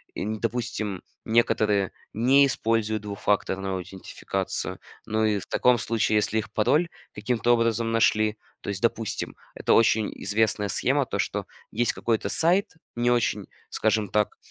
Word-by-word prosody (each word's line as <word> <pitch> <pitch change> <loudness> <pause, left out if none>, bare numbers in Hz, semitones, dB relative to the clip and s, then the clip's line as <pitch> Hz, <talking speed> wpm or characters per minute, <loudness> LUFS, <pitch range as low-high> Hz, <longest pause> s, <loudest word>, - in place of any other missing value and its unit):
и - - -3
не, 110 +1 -3
допустим, 115 -4 -3 0.2
некоторые 105 -3 +2 0.2
не 130 +5 +5
используют 110 -4 0
двухфакторную 100 -2 -1
аутентификацию. 95 +1 -4 0.3
Ну 110 0 +1
и, 105 -2 +1
в - - -10
таком 125 -1 +3
случае, 110 -2 +1
если 105 +1 0
их 110 - -3
пароль 140 +11 +2 0.3
каким-то 115 +3 +1
образом 115 -1 +1
нашли, 110 -1 +2 0.2
то - - -6
есть, 100 0 -3
допустим, 115 -2 -1 0.2
это - - +1
очень 110 -2 +4
известная 105 0 +1
схема, - - +1
то, - - -3
что - - -2 0.2
есть 120 +2 +1
какой-то 115 -2 -1
сайт 175 +3 +2 0.2
не 120 +1 +1
очень, 120 -1 0 0.2
скажем 110 -1 +1
так, 105 +1 0
110 Hz, 145 wpm, -25 LUFS, 105-115 Hz, 0.3 s, не